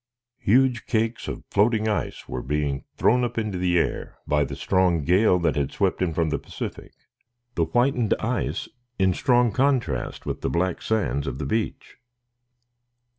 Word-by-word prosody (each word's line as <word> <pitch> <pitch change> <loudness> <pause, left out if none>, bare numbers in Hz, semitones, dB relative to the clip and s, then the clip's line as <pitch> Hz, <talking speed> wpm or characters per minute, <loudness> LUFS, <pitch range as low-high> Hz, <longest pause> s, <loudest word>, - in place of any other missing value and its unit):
Huge 125 +2 +2
cakes 115 0 -1
of - - -5
floating 110 +1 +2
ice 105 - -2
were 65 - -4
being 70 0 -2
thrown 125 +2 +3
up 120 -1 -3
into 105 -5 -2
the 90 -1 +2
air 80 - -1
by 75 0 +2
the - - -5
strong 90 -4 +2
gale 90 +5 +4
that 75 -5 0
swept 95 -3 0
in 90 -2 +1
from 80 -1 0
the - - 0
Pacific, - - -7 0.6
the 85 - +1
whitened 120 +4 +2
ice 120 +3 -2 0.3
in 95 -1 +3
strong 120 +3 +3
contrast 120 - 0
with - - -4
the - - -1
black 90 +1 0
sands 70 - -1
of 65 -1 -3
the 75 - -4
beach. 110 -1 -3
95 Hz, 160 wpm, -24 LUFS, 80-115 Hz, 0.6 s, gale